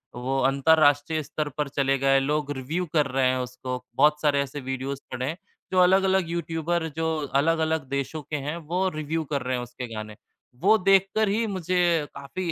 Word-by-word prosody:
वो 130 Hz, +2 st, -2 dB
अंतरराष्ट्रीय 145 Hz, +1 st, +3 dB
स्तर 150 Hz, +1 st, -3 dB
पर 150 Hz, -, 0 dB
चले 135 Hz, -1 st, +1 dB
गए, 135 Hz, 0 st, +3 dB
लोग 145 Hz, +1 st, -1 dB
रिव्यू 160 Hz, +8 st, -2 dB
कर 150 Hz, -3 st, +3 dB
रहे 135 Hz, -1 st, +1 dB
हैं 130 Hz, -, +1 dB
उसको। 125 Hz, 0 st, -5 dB
बहुत 150 Hz, 0 st, +4 dB
सारे 145 Hz, -2 st, +3 dB
ऐसे 140 Hz, +1 st, -5 dB
वीडियोज़ 130 Hz, +1 st, -4 dB
पड़े 130 Hz, 0 st, -3 dB
हैं, 160 Hz, +5 st, -3 dB, 0.3 s
जो 185 Hz, -, +3 dB
अलग-अलग 190 Hz, -1 st, +4 dB
यूट्यूबर 170 Hz, 0 st, -1 dB
जो 160 Hz, 0 st, 0 dB, 0.3 s
अलग-अलग 160 Hz, -2 st, 0 dB
देशों 140 Hz, +3 st, -3 dB
के 150 Hz, +2 st, -6 dB
हैं, 145 Hz, +2 st, -3 dB
वो 175 Hz, +4 st, -1 dB
रिव्यू 155 Hz, +1 st, -2 dB
कर 140 Hz, -, 0 dB
रहे 130 Hz, 0 st, -1 dB
हैं 125 Hz, -, -3 dB
उसके 125 Hz, +1 st, -7 dB
गाने। 110 Hz, 0 st, -6 dB, 0.5 s
वो 215 Hz, +4 st, +5 dB
देखकर 195 Hz, +3 st, +3 dB
ही 220 Hz, +3 st, +1 dB
मुझे 175 Hz, -4 st, +1 dB
काफ़ी 165 Hz, +6 st, -4 dB
150 Hz, 180 wpm, -25 LUFS, 135-170 Hz, 0.5 s, वो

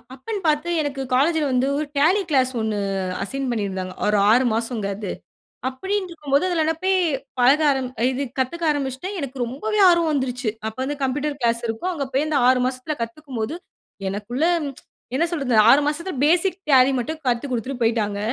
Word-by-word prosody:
அப்பன்னு 405 Hz, -, -5 dB
பார்த்து 300 Hz, +3 st, 0 dB
எனக்கு 275 Hz, -2 st, -3 dB
காலேஜ்ல 310 Hz, +3 st, +2 dB
வந்து 255 Hz, +1 st, +2 dB
ஒரு 305 Hz, -, -1 dB
டாலி 370 Hz, +7 st, +4 dB
கிளாஸ் 260 Hz, -2 st, +3 dB
1 220 Hz, -1 st, -1 dB, 0.5 s
அசைன் 270 Hz, +3 st, -3 dB
பண்ணியிருந்தாங்க. 190 Hz, -4 st, -3 dB
ஒரு 210 Hz, 0 st, +3 dB
6 250 Hz, +3 st, +4 dB
மாசம்ங்க 230 Hz, -3 st, -2 dB
அது. 205 Hz, -3 st, -4 dB, 0.6 s
அப்டின்று 380 Hz, +8 st, -3 dB
இருக்கும்போது 295 Hz, -1 st, 0 dB
அதுல 320 Hz, -2 st, +1 dB
போய் 380 Hz, 0 st, +3 dB, 0.4 s
பழக 270 Hz, +5 st, +5 dB
ஆரம் 265 Hz, -2 st, -1 dB, 0.2 s
இது 265 Hz, +2 st, -2 dB, 0.2 s
கத்துக்க 300 Hz, +7 st, -2 dB
ஆரம்பிச்சுட்டேன் 290 Hz, +7 st, -3 dB
எனக்கு 275 Hz, -3 st, -5 dB
ரொம்பவே 425 Hz, -, -3 dB
ஆர்வம் 340 Hz, -2 st, +3 dB
வந்துருச்சு. 255 Hz, -4 st, -1 dB, 0.2 s
அப்ப 220 Hz, -, -6 dB
வந்து 290 Hz, +2 st, -2 dB
கம்ப்யூட்டர் 285 Hz, +2 st, -1 dB
கிளாஸ் 235 Hz, -1 st, +1 dB
இருக்கும். 225 Hz, +12 st, -2 dB
அங்க 285 Hz, -4 st, -3 dB
போய் 275 Hz, +3 st, +2 dB
அந்த 300 Hz, -2 st, +1 dB
6 255 Hz, 0 st, +5 dB
மாசத்துல 255 Hz, +4 st, -3 dB
கத்துக்கும் 255 Hz, +3 st, -6 dB
போது, 220 Hz, +9 st, -3 dB, 0.5 s
எனக்குள்ள 220 Hz, +9 st, -3 dB, 0.7 s
என்ன 330 Hz, -, +2 dB
சொல்றது 275 Hz, -8 st, 0 dB
6 280 Hz, +4 st, +7 dB
மாசத்துல 335 Hz, +5 st, -2 dB
பேசிக் 350 Hz, +4 st, +3 dB
டேலி 260 Hz, 0 st, +6 dB
மட்டும் 310 Hz, +6 st, -4 dB
கத்துக்குடுத்துட்டு 250 Hz, +1 st, -2 dB
போயிட்டாங்க. 215 Hz, -3 st, 0 dB
270 Hz, 165 wpm, -22 LUFS, 240-310 Hz, 0.7 s, 6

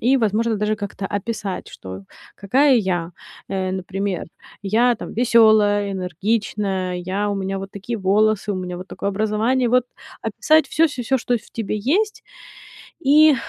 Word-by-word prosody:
и, 260 Hz, +4 st, +3 dB
возможно, 225 Hz, 0 st, +1 dB
даже 210 Hz, +1 st, 0 dB
как-то 205 Hz, -2 st, -6 dB
описать, 205 Hz, -2 st, -4 dB
что 95 Hz, +1 st, -9 dB, 0.3 s
какая 260 Hz, +7 st, +3 dB
я. 175 Hz, -5 st, -1 dB, 0.4 s
Э, 190 Hz, -1 st, -2 dB
например: 190 Hz, 0 st, -3 dB, 0.4 s
я, 230 Hz, +5 st, +3 dB
там, 230 Hz, -, -8 dB
весёлая, 215 Hz, -4 st, +4 dB
энергичная, 190 Hz, 0 st, -1 dB
я 185 Hz, +4 st, -2 dB
у -, -, -1 dB
меня 195 Hz, 0 st, -3 dB
вот 195 Hz, 0 st, -7 dB
такие 210 Hz, +4 st, -5 dB
волосы, 210 Hz, +2 st, +2 dB
у 190 Hz, -, -3 dB
меня 180 Hz, -1 st, -4 dB
вот 185 Hz, +1 st, -9 dB
такое 200 Hz, -, -3 dB
образование. 220 Hz, +5 st, +1 dB
Вот 250 Hz, 0 st, +3 dB, 0.4 s
описать 315 Hz, 0 st, +3 dB
всё 330 Hz, +1 st, +3 dB
всё 265 Hz, -5 st, -5 dB
всё, 265 Hz, +3 st, +1 dB
что 245 Hz, -, 0 dB
в 220 Hz, -, -11 dB
тебе 220 Hz, -2 st, -3 dB
есть, 390 Hz, -, 0 dB, 0.8 s
и 300 Hz, 0 st, +6 dB
210 Hz, 155 wpm, -21 LUFS, 190-235 Hz, 0.8 s, и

